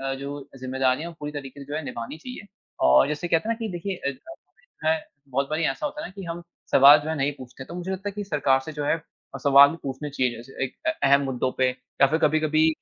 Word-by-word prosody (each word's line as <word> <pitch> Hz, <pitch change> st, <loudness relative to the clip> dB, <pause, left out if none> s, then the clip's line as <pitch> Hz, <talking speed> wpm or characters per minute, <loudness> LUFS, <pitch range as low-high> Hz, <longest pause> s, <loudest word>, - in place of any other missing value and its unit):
अ, 135 Hz, 0 st, -1 dB
जो 140 Hz, +1 st, -7 dB
जिम्मेदारियाँ 130 Hz, +5 st, 0 dB
पूरी 150 Hz, 0 st, -5 dB
तरीके 140 Hz, -1 st, -8 dB
से 140 Hz, -, -9 dB
जो 145 Hz, -, -6 dB
है 155 Hz, -, -4 dB
निभानी 120 Hz, +1 st, -6 dB
चाहिए। 250 Hz, +2 st, -9 dB, 0.4 s
और 65 Hz, 0 st, +6 dB
जैसे 150 Hz, +4 st, -3 dB
कहते 165 Hz, +6 st, +1 dB
है 230 Hz, -, +2 dB
ना -, -, -15 dB
कि 225 Hz, -2 st, -3 dB
देखिए 185 Hz, +2 st, -4 dB
अ 140 Hz, -, -3 dB
अ, 140 Hz, -, -1 dB
इ 330 Hz, -, -14 dB
है 160 Hz, -, +4 dB, 0.3 s
बहुत 135 Hz, +1 st, -1 dB
बारी 155 Hz, +2 st, 0 dB
ऐसा 150 Hz, -, -1 dB
होता 300 Hz, +1 st, -5 dB
है -, -, -4 dB
ना 185 Hz, -, -14 dB
कि 195 Hz, -, -8 dB
हम 170 Hz, +1 st, -5 dB, 0.3 s
सवाल 140 Hz, +2 st, +9 dB
जो 150 Hz, -, -6 dB
है 160 Hz, -, 0 dB
नहीं 140 Hz, 0 st, 0 dB
पूछते। 130 Hz, +1 st, -10 dB
तो 170 Hz, -, -10 dB
मुझे 180 Hz, +1 st, -5 dB
लगता 190 Hz, +2 st, -4 dB
है 200 Hz, -, -5 dB
कि 205 Hz, 0 st, -5 dB
सरकार 145 Hz, -6 st, +2 dB
से 155 Hz, +4 st, -8 dB
जो 145 Hz, -1 st, -4 dB
है -, -, +2 dB
अ, 160 Hz, -3 st, -14 dB
सवाल 140 Hz, +2 st, +7 dB
पूछने 140 Hz, +2 st, -5 dB
चाहिए 130 Hz, -3 st, 0 dB
जैसे 135 Hz, +3 st, -5 dB
एक 130 Hz, -, -6 dB
अ -, -, +4 dB, 0.2 s
अहम 140 Hz, 0 st, +5 dB
मुद्दों 130 Hz, -1 st, -1 dB
पे 130 Hz, -1 st, +4 dB, 0.3 s
या 135 Hz, -, +8 dB
फिर 155 Hz, +4 st, +1 dB
कभी-कभी 155 Hz, 0 st, +3 dB
145 Hz, 260 wpm, -25 LUFS, 135-165 Hz, 0.4 s, सवाल